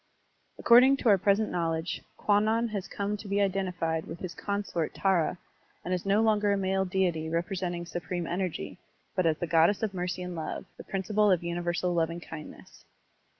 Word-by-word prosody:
According 255 +3 +6
to 245 - +1
our 200 -2 +6
present 200 +3 +2
knowledge, 165 0 -2 0.2
Kwannon 220 +3 +2
has 200 -3 -4
come 205 +1 -2
to 205 - -10
be 200 +1 0
identified 180 -5 -1
with 165 - -6
his 180 -2 -5
consort 200 -4 -3
Tkvk 185 -4 +1 0.5
and 180 - -1
is 180 +1 -2
no 205 +3 +4
longer 210 -2 +3
a 200 - +2
male 190 0 0
deity 180 -4 0
representing 175 +1 -2
supreme 175 0 -4
energy, 180 0 -3 0.4
but 185 -3 +2
as 155 -1 +2
the 175 - -2
goddess 170 +6 +3
of 210 -3 -1
mercy 180 0 -3
and 180 0 -5
love, 160 -1 -5
the - - -10
prin 195 -1 -3
ciple 210 +1 +3
of 175 -2 +2
universal 175 +1 -1
lovingkindness. 165 -2 -5
185 Hz, 175 wpm, -29 LUFS, 170-200 Hz, 0.5 s, According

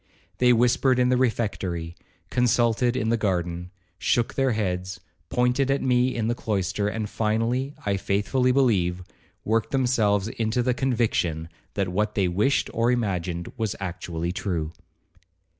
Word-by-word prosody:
They 125 0 +5
whispered 125 +2 +3
in 125 0 +3
the 125 - +3
refectory, 100 -9 -1 0.4
consulted 120 0 +2
in 110 -3 0
the 115 - +2
garden,—shook 90 +3 -2
their 135 -2 +1
heads, 95 -3 -2 0.3
pointed 125 +2 +1
at 135 0 +1
me 125 0 +2
in 115 -2 -1
the 120 - +1
cloister, 100 -3 -1
and 105 0 -2
finally, 115 +6 -1
I 100 -1 +1
faithfully 105 +7 +1
believe, 95 -9 +2 0.4
worked 110 +1 +1
themselves 110 -7 +2
into 115 +1 -1
the 125 0 +2
conviction 110 - 0 0.3
that 100 -2 0
what 105 +4 -1
they 100 -3 +2
wished 105 +10 +1
or 115 +2 +2
imagined 90 -7 -2
was 110 -3 -1
actually 85 -2 -4
true. 85 -4 -2
110 Hz, 140 wpm, -25 LUFS, 90-125 Hz, 0.4 s, They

